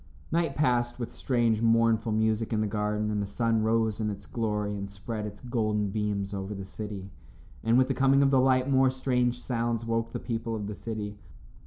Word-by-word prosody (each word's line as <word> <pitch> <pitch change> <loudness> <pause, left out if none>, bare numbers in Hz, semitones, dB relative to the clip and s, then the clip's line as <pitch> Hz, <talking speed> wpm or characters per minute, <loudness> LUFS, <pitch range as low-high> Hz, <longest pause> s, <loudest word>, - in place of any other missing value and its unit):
Night 165 -3 +1
passed 120 -5 +1
with 120 -2 -4
strange, 115 -4 +1
mournful 115 -1 +3
music 110 +1 +1
in 110 - +1
the - - +1
garden, 105 +1 -1
and 105 -1 0
the 100 - -3
sun 115 +2 +1
rose 110 -1 +1
in 110 -1 0
its 100 -1 -6
glory 105 -3 -2
and 100 0 -5
spread 105 +2 -5
its 105 0 -10
golden 110 -5 0
beams 105 -1 -2
over 100 +1 -4
the 95 0 -6
city. 100 -1 -7 0.5
And 115 +2 +4
with 130 0 +4
the 135 - +1
coming 135 +1 +4
of 135 - +3
the 130 -2 +5
light, 130 0 +3
more 135 -1 +4
strange 125 -2 0
sounds 115 -2 -1
woke 115 0 -1
the - - -4
people 115 -1 -3
of 105 -2 -4
the 105 - -4
city. 105 -1 -5
110 Hz, 205 wpm, -28 LUFS, 105-120 Hz, 0.5 s, the